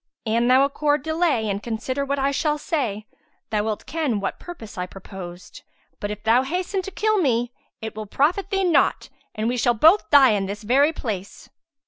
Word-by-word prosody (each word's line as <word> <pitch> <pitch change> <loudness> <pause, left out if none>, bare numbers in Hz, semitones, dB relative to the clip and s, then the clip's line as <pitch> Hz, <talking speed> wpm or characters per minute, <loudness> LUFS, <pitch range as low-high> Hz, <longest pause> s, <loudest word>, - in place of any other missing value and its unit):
An 230 +2 +1
thou 260 +2 +5
accord 290 0 0
delay 315 -8 +1
and 200 0 -2
consider 245 +5 -3
what 280 0 -1
I 275 0 +1
shall 300 +2 0
say, 240 -10 -2 0.5
thou 210 -1 +1
wilt 215 -1 -3
ken 295 -9 -1
what 195 - -4
purpose 285 -12 -10
I 180 0 -3
proposed; 185 -2 -10 0.4
but 205 - -3
if 210 0 -6
thou 230 +3 +4
hasten 360 +7 -2
to 370 - -7
kill 430 +2 +1
me 245 -6 +1 0.3
it 220 - -5
will 215 -1 -6
profit 345 - +1
thee 390 -1 0
naught 350 -3 +2 0.3
and 215 0 -1
we 245 +1 0
shall 240 0 +2
both 325 - +5
die 275 -4 +7
in 200 -2 0
this 205 +2 -6
very 275 +8 +4
place." 205 - -6
250 Hz, 190 wpm, -23 LUFS, 215-305 Hz, 0.5 s, die